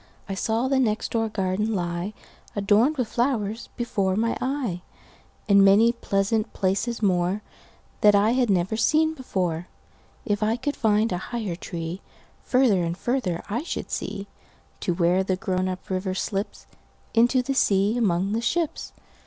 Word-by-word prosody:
I 195 - -3
saw 225 +5 0
the 270 0 +2
next 220 -4 0
door 225 -1 0
garden 210 +2 -1
lie, 175 +2 -3 0.4
Adorned 215 +9 +3
with 250 -4 0
flowers, 230 -2 -1
before 195 -6 0
my 230 +3 +1
eye, 255 -10 -2 0.7
And 200 -1 +6
many 205 +4 +6
pleasant 215 -1 -1
places 200 +5 -1
moreThat 195 +2 0
I 205 +2 +4
had 250 -2 +2
never 185 +2 +1
seen 315 +7 +3
before. 180 - -2 0.6
If 205 -3 0
I 215 +1 +2
could 290 +4 -2
find 220 0 +2
a 180 - -1
higher 220 -7 -3
treeFarther 185 +6 -1
and 170 +1 -2
farther 220 -8 -1
I 230 +5 -2
should 335 - -5
see, 195 - -4 0.5
To 175 - -1
where 180 +2 +2
the 190 -1 0
grown 185 -2 -1
up 185 0 -6
river 185 0 -2
slipsInto 230 +5 -1
the 275 - 0
sea 200 -3 +2
among 195 -4 +1
the 225 +2 0
ships. 320 +6 -2
210 Hz, 145 wpm, -25 LUFS, 185-235 Hz, 0.7 s, And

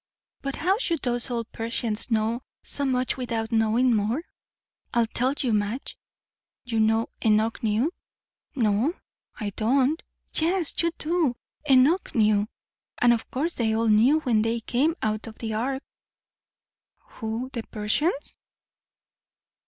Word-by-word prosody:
But 275 -1 -3
how 380 +5 +1
should 335 - -1
those 245 0 -1
old 235 -2 -3
Persians 230 -1 -1
know 225 +1 +1 0.2
so 285 - 0
much, 255 -1 0
with 250 -2 -5
out 225 0 -1
knowing 230 +2 +3
more? 220 +9 0 0.7
I'll 235 -1 +4
tell 255 +4 0
you, 245 -4 0
Madge! 210 +5 -1 0.7
You 230 -2 -1
know, 220 +1 +3 0.2
Enoch 220 +1 +2
knew?" 225 +8 +1 0.6
"No, 230 - +2 0.4
I 205 -1 -2
don't." 260 - +2 0.3
"Yes, 340 0 +2
you 335 - +2
do! 315 -5 +1 0.3
Enoch 275 +8 +4
knew. 210 -2 +3 0.5
And 240 -1 +5
of 230 - -3
course 315 +6 -1
they 220 -2 0
all 225 0 +2
knew 245 +9 +5
when 235 -7 +2
they 225 +1 0
came 280 +9 +1
out 215 +1 -1
of 225 - -10
the 220 -2 -4
ark" 265 +5 -2 1.1
"Who 230 +3 -5
the 235 - -2
Persians?" 275 - -1
235 Hz, 135 wpm, -26 LUFS, 220-270 Hz, 1.1 s, And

